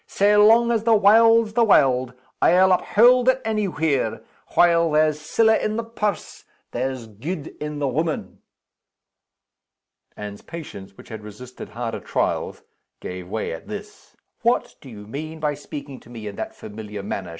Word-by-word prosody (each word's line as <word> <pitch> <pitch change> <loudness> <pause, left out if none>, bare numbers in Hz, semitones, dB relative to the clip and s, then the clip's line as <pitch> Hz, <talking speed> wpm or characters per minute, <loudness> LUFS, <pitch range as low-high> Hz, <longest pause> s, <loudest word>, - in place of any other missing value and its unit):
Sae 205 +1 +2
long 225 +3 +5
as 225 -2 0
the 225 -1 +4
warld's 225 +2 +5
the 235 - +3
warld, 130 - +3 0.3
I'll 185 +2 +5
uphaud 245 +7 +4
it 260 0 +4
any 215 -2 0
where 160 -6 -1 0.3
while 170 -1 +4
there's 155 0 +2
siller 220 +8 +3
in 215 -1 0
the 230 - -2
purse, 210 -5 -4 0.3
there's 130 -1 -3
gude 140 - -6
in 150 0 -4
the 145 -1 -1
woman!" 155 +4 -3 1.8
Anne's 105 -1 -8
patience, 100 - -10
which - - -14
had 110 -2 -7
resisted 105 +5 -10
harder 115 -1 -5
trials, - - -2 0.4
gave 90 -1 -7
way 110 -4 -3
at 80 - -9
this. - - -10 0.2
"What - - +1
do 135 - -12
you 105 -3 -11
mean 155 +8 -7
by 150 -1 0
speaking 140 -1 -9
to - - -19
me 115 -3 -9
in 100 -1 -6
that - - -5
familiar 105 -1 -8
manner?" 95 -2 -5
150 Hz, 160 wpm, -22 LUFS, -, 1.8 s, long